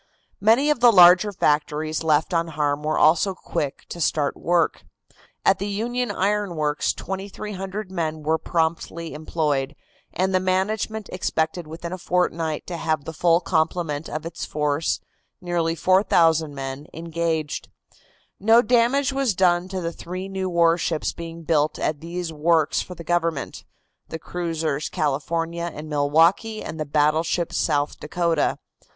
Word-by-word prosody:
Many 230 Hz, +9 st, +4 dB
of 295 Hz, -, 0 dB
the 240 Hz, 0 st, +7 dB
larger 180 Hz, +1 st, +7 dB
factories 155 Hz, -2 st, 0 dB
left 160 Hz, +3 st, +2 dB
unharmed 150 Hz, -3 st, 0 dB
were 155 Hz, +1 st, 0 dB
also 180 Hz, +4 st, +4 dB
quick 145 Hz, -5 st, -4 dB
to 170 Hz, -, -6 dB
start 145 Hz, -2 st, +1 dB
work. 175 Hz, 0 st, +1 dB, 0.6 s
At 195 Hz, -, +4 dB
the 200 Hz, -, -2 dB
Union 240 Hz, +5 st, -2 dB
Iron 205 Hz, -2 st, 0 dB
Works 150 Hz, -1 st, 0 dB
2,300 195 Hz, +1 st, -6 dB
men 160 Hz, -4 st, -3 dB
were 160 Hz, +2 st, +1 dB
promptly 165 Hz, 0 st, -2 dB
employed, 150 Hz, -2 st, -1 dB, 0.4 s
and 190 Hz, +1 st, 0 dB
the 185 Hz, -, +4 dB
management 205 Hz, +3 st, -1 dB
expected 160 Hz, -2 st, -1 dB
within 170 Hz, +2 st, -6 dB
a 185 Hz, -, -6 dB
fortnight 165 Hz, -3 st, -1 dB
to 175 Hz, -, -5 dB
have 155 Hz, -2 st, -1 dB
the 160 Hz, -, -6 dB
full 170 Hz, +1 st, +3 dB
complement 160 Hz, -2 st, -1 dB
of 155 Hz, +1 st, -5 dB
its 165 Hz, 0 st, -6 dB
force, 150 Hz, +1 st, -1 dB, 0.4 s
nearly 170 Hz, -3 st, -1 dB
4,000 165 Hz, -4 st, +3 dB
men, 135 Hz, +2 st, -6 dB
engaged. 165 Hz, -2 st, -2 dB, 0.7 s
No 225 Hz, +4 st, +5 dB
damage 250 Hz, +4 st, +2 dB
was 270 Hz, -7 st, 0 dB
done 175 Hz, -1 st, +3 dB
to 190 Hz, -1 st, -4 dB
the 170 Hz, 0 st, -3 dB
three 185 Hz, +3 st, -6 dB
new 190 Hz, -1 st, -3 dB
warships 170 Hz, -2 st, +1 dB
being 165 Hz, 0 st, -8 dB
built 155 Hz, -1 st, +1 dB
at 150 Hz, -1 st, -1 dB
these 170 Hz, 0 st, -5 dB
works 160 Hz, 0 st, +2 dB
for 180 Hz, -, -8 dB
the 170 Hz, -, -9 dB
government, 165 Hz, -3 st, -2 dB, 0.4 s
the 160 Hz, -, -4 dB
cruisers 160 Hz, -4 st, -3 dB
California 165 Hz, +4 st, -2 dB
and 155 Hz, +1 st, -8 dB
Milwaukee 160 Hz, +9 st, +2 dB
and 160 Hz, -, -7 dB
the 155 Hz, -, -3 dB
battleship 155 Hz, +3 st, +1 dB
South 145 Hz, 0 st, 0 dB
Dakota. 170 Hz, +2 st, 0 dB
170 Hz, 145 wpm, -23 LUFS, 155-185 Hz, 0.7 s, the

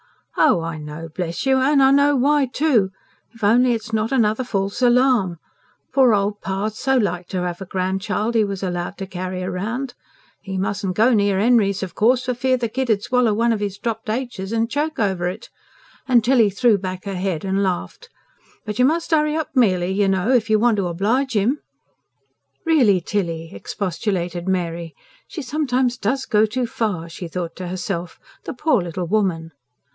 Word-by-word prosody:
"Oh, 265 Hz, -, +4 dB
I 165 Hz, -1 st, -5 dB
know, 150 Hz, +2 st, -7 dB
bless 170 Hz, +3 st, -3 dB
you! 265 Hz, 0 st, +4 dB
and 270 Hz, 0 st, +4 dB
know 285 Hz, +1 st, +4 dB
why, 280 Hz, +1 st, +3 dB
too. 250 Hz, -7 st, +2 dB, 0.5 s
If 230 Hz, -, -13 dB
only 240 Hz, +4 st, +4 dB
it's 225 Hz, 0 st, -5 dB
not 220 Hz, +2 st, 0 dB
another 230 Hz, -2 st, +2 dB
false 200 Hz, -1 st, -2 dB
alarm! 245 Hz, -7 st, +3 dB, 0.6 s
Poor 255 Hz, -5 st, +5 dB
old 205 Hz, +1 st, -1 dB
pa' 195 Hz, +2 st, -2 dB
so 265 Hz, +5 st, 0 dB
like 180 Hz, -6 st, -1 dB
to 185 Hz, -1 st, -3 dB
have 175 Hz, +1 st, -4 dB
a 190 Hz, -, -6 dB
grandchild 190 Hz, +5 st, -2 dB
'e 225 Hz, -, +4 dB
was 200 Hz, -2 st, -4 dB
allowed 175 Hz, -1 st, -3 dB
to 195 Hz, -, -5 dB
carry 185 Hz, 0 st, -5 dB
round. 220 Hz, +8 st, -3 dB, 0.5 s
'E 195 Hz, -2 st, -5 dB
mustn'n 195 Hz, 0 st, -2 dB
go 225 Hz, +6 st, +4 dB
near 200 Hz, -3 st, +2 dB
Henry's, 205 Hz, -4 st, +3 dB
of 180 Hz, -3 st, -6 dB
course, 245 Hz, +3 st, +2 dB
for 250 Hz, -, 0 dB
fear 255 Hz, +1 st, +1 dB
the 240 Hz, -1 st, -1 dB
kid 260 Hz, +2 st, -2 dB
'ud 205 Hz, -2 st, +2 dB
swallow 245 Hz, -4 st, +2 dB
one 230 Hz, +1 st, +2 dB
of 210 Hz, -, -3 dB
'is 200 Hz, -1 st, -3 dB
dropped 225 Hz, 0 st, -4 dB
aitches 220 Hz, -4 st, -3 dB
and 230 Hz, +1 st, 0 dB
choke 305 Hz, +3 st, -1 dB
over 190 Hz, -5 st, 0 dB
it." 190 Hz, +5 st, -6 dB, 0.6 s
And 245 Hz, -3 st, +4 dB
Tilly 240 Hz, -3 st, +4 dB
threw 210 Hz, +1 st, +2 dB
back 185 Hz, 0 st, -5 dB
her 200 Hz, -, -3 dB
head 185 Hz, -2 st, -2 dB
and 195 Hz, +1 st, 0 dB
laughed. 190 Hz, -, -3 dB, 0.6 s
"But 210 Hz, +1 st, -5 dB
you 250 Hz, -, +6 dB
must 330 Hz, +5 st, 0 dB
hurry 305 Hz, -1 st, +2 dB
up, 315 Hz, -2 st, -2 dB
Mely, 190 Hz, -8 st, +2 dB
you 200 Hz, +1 st, +1 dB
know, 195 Hz, +4 st, +1 dB
if 235 Hz, -4 st, +2 dB
you 215 Hz, -, +4 dB
want 225 Hz, 0 st, +3 dB
to 195 Hz, -3 st, 0 dB
oblige 225 Hz, +10 st, 0 dB
'im." 230 Hz, +9 st, +1 dB, 1.1 s
"Really, 250 Hz, -, +4 dB
Tilly!" 165 Hz, -4 st, -3 dB
expostulated 175 Hz, -, -3 dB
Mary. 170 Hz, -3 st, -2 dB, 0.3 s
("She 320 Hz, -7 st, -6 dB
sometimes 255 Hz, -3 st, 0 dB
DOES 265 Hz, +6 st, -1 dB
go 215 Hz, 0 st, +3 dB
too 245 Hz, +3 st, -2 dB
far," 210 Hz, -8 st, -2 dB
she 170 Hz, +1 st, -7 dB
thought 170 Hz, 0 st, -5 dB
to 185 Hz, -, -5 dB
herself. 180 Hz, -1 st, -4 dB, 0.3 s
"The -, -, -4 dB
poor 255 Hz, -, +2 dB
little 175 Hz, +1 st, -4 dB
woman!") 175 Hz, -4 st, 0 dB
210 Hz, 185 wpm, -21 LUFS, 185-250 Hz, 1.1 s, you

